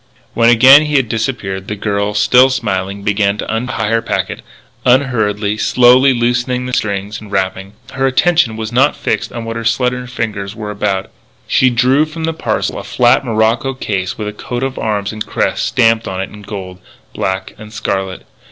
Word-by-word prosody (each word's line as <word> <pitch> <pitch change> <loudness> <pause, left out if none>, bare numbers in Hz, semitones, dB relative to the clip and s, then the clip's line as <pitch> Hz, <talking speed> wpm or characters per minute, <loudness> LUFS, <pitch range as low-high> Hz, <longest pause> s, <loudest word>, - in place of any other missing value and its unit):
When 115 0 +4
again 130 +5 +7
he 150 - -2
had 130 -5 +2
disappeared, 110 -5 -3
the 105 - -3
girl, 100 0 -2
still 125 +6 +5
smiling, 100 -6 -2
began 105 -1 +1
to 110 - -3
untie 115 -2 -2
her 115 0 +2
packet, - - -3 0.4
unhurriedly, 110 -5 +1
slowly 125 +3 +5
loosening 125 +1 -1
string 100 -2 -2
and 105 -2 -13
wrapping. 95 0 -2 0.2
Her 135 0 0
attention 135 -3 +2
was 110 0 -4
not 135 +4 +3
fixed - - -2
on 115 -2 -6
what 115 0 -4
her 115 - -4
slender 125 +2 0
fingers 105 -4 -4
were 105 -1 -5
about. 100 -2 -2 0.4
She 130 - +3
drew 125 +5 +3
from 160 +1 -7
the 165 0 -1
parcel 160 - -2
a - - -7
flat 120 +1 +2
morocco 115 +3 0
case 95 -7 -3
with 105 -1 -4
a 105 - -4
coat 120 +4 -5
of 135 0 -3
arms 105 -1 -2
and 110 0 -4
crest - - -1
stamped 115 0 +2
on 95 -1 -4
it 95 - -4
in 105 - -12
gold, 95 -3 -8 0.3
black, 95 0 -3
and 110 0 -11
scarlet. 95 -4 -3
115 Hz, 180 wpm, -15 LUFS, 100-125 Hz, 0.4 s, again